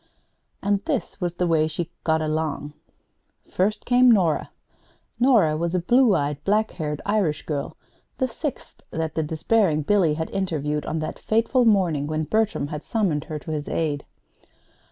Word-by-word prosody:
And 200 Hz, 0 st, +1 dB
this -, -, -3 dB
was 175 Hz, -1 st, -2 dB
the 180 Hz, -, 0 dB
way 160 Hz, -2 st, +2 dB
she 165 Hz, +2 st, -4 dB
"got 160 Hz, -1 st, +1 dB
along." 155 Hz, -1 st, -2 dB, 0.8 s
First 205 Hz, +4 st, 0 dB
came 250 Hz, 0 st, +5 dB
Nora. 180 Hz, -9 st, +3 dB, 0.7 s
Nora 230 Hz, -, +4 dB
was 170 Hz, +3 st, -1 dB
a -, -, +2 dB
blue 240 Hz, +4 st, +4 dB
eyed, 145 Hz, -2 st, -2 dB
black 215 Hz, +2 st, +1 dB
haired 150 Hz, -3 st, -4 dB
Irish 200 Hz, -8 st, 0 dB
girl, 145 Hz, -3 st, -4 dB, 0.4 s
the 260 Hz, -, +1 dB
sixth 275 Hz, +3 st, -6 dB
that 160 Hz, -1 st, -3 dB
the 160 Hz, -, 0 dB
despairing 160 Hz, +1 st, +1 dB
Billy 175 Hz, -3 st, +3 dB
had 160 Hz, +1 st, -4 dB
interviewed 150 Hz, -6 st, -2 dB
on 160 Hz, -, -2 dB
that 155 Hz, -, -5 dB
fateful 230 Hz, +3 st, +2 dB
morning 175 Hz, -10 st, +2 dB
when 155 Hz, +1 st, -1 dB
Bertram 215 Hz, -5 st, 0 dB
had 150 Hz, 0 st, -5 dB
summoned 185 Hz, -, 0 dB
her 155 Hz, -, -5 dB
to 155 Hz, +2 st, -7 dB
his 150 Hz, -1 st, -3 dB
aid. 150 Hz, -3 st, -1 dB
165 Hz, 160 wpm, -24 LUFS, 155-210 Hz, 0.8 s, came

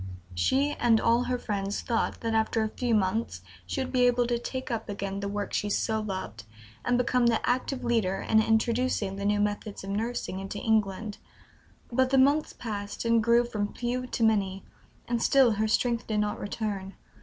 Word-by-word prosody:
She, 265 Hz, -, +2 dB
and 230 Hz, -2 st, +4 dB
all 235 Hz, +2 st, +3 dB
her 250 Hz, -, 0 dB
friends, 200 Hz, -3 st, -3 dB
thought 230 Hz, -2 st, -1 dB
that 230 Hz, -1 st, -1 dB
after 220 Hz, 0 st, +1 dB
a 220 Hz, -, -1 dB
few 240 Hz, 0 st, 0 dB
months 210 Hz, +3 st, -1 dB, 0.2 s
she 270 Hz, -, -1 dB
would 260 Hz, -, -7 dB
be 250 Hz, -1 st, +4 dB
able 245 Hz, 0 st, +3 dB
to 240 Hz, 0 st, 0 dB
take 260 Hz, +1 st, -5 dB
up 225 Hz, -2 st, -3 dB
again 195 Hz, -1 st, -3 dB
the 200 Hz, -, -3 dB
work 205 Hz, 0 st, -4 dB
she 205 Hz, -, 0 dB
so 220 Hz, +2 st, 0 dB
loved, 190 Hz, -, -5 dB, 0.4 s
and 245 Hz, 0 st, +2 dB
become 250 Hz, 0 st, +2 dB
the 230 Hz, -2 st, +1 dB
active 255 Hz, +1 st, 0 dB
leader 225 Hz, -6 st, +1 dB
in 220 Hz, 0 st, +3 dB
introducing 225 Hz, -2 st, +1 dB
the 200 Hz, -, -4 dB
new 205 Hz, 0 st, +2 dB
methods 205 Hz, 0 st, -2 dB
of 195 Hz, -, -5 dB
nursing 220 Hz, -2 st, -2 dB
into 195 Hz, +1 st, -6 dB
England. 210 Hz, -1 st, 0 dB, 0.7 s
But 260 Hz, +2 st, +2 dB
the 270 Hz, -, +3 dB
months 285 Hz, +4 st, +4 dB
passed, 205 Hz, -1 st, -5 dB
and 230 Hz, -1 st, +3 dB
grew 235 Hz, +2 st, +4 dB
from 210 Hz, -3 st, -3 dB
few 250 Hz, +1 st, -2 dB
to 240 Hz, -, -2 dB
many, 195 Hz, -3 st, +1 dB, 0.4 s
and 235 Hz, -1 st, -1 dB
still 265 Hz, -4 st, +5 dB
her 215 Hz, +1 st, 0 dB
strength 235 Hz, +1 st, +1 dB
did 215 Hz, -1 st, 0 dB
not 210 Hz, 0 st, -2 dB
return. 200 Hz, -2 st, -4 dB
225 Hz, 190 wpm, -28 LUFS, 205-240 Hz, 0.7 s, still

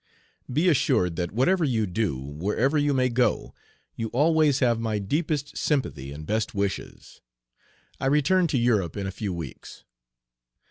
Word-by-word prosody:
Be 155 Hz, +8 st, +2 dB
assured 90 Hz, -, +2 dB
that 85 Hz, -1 st, -2 dB
whatever 165 Hz, -, +2 dB
you 115 Hz, -7 st, +1 dB
do, 95 Hz, -6 st, -1 dB
wherever 90 Hz, -, -1 dB
you 145 Hz, -1 st, +2 dB
may 130 Hz, -2 st, +2 dB
go, 125 Hz, 0 st, 0 dB, 0.4 s
you 115 Hz, -, -3 dB
always 150 Hz, +3 st, +3 dB
have 120 Hz, -4 st, +2 dB
my 110 Hz, -2 st, -1 dB
deepest 145 Hz, -, -2 dB
sympathy 75 Hz, -, -1 dB
and 75 Hz, +2 st, -8 dB
best 110 Hz, +3 st, -1 dB
wishes. 100 Hz, -1 st, -4 dB, 0.8 s
I -, -, -1 dB
return 150 Hz, +6 st, +3 dB
to 145 Hz, -, 0 dB
Europe 110 Hz, -7 st, +1 dB
in 100 Hz, -, -3 dB
a 95 Hz, -, -3 dB
few 100 Hz, 0 st, -4 dB
weeks. 85 Hz, -6 st, -8 dB
115 Hz, 150 wpm, -25 LUFS, 95-145 Hz, 0.8 s, always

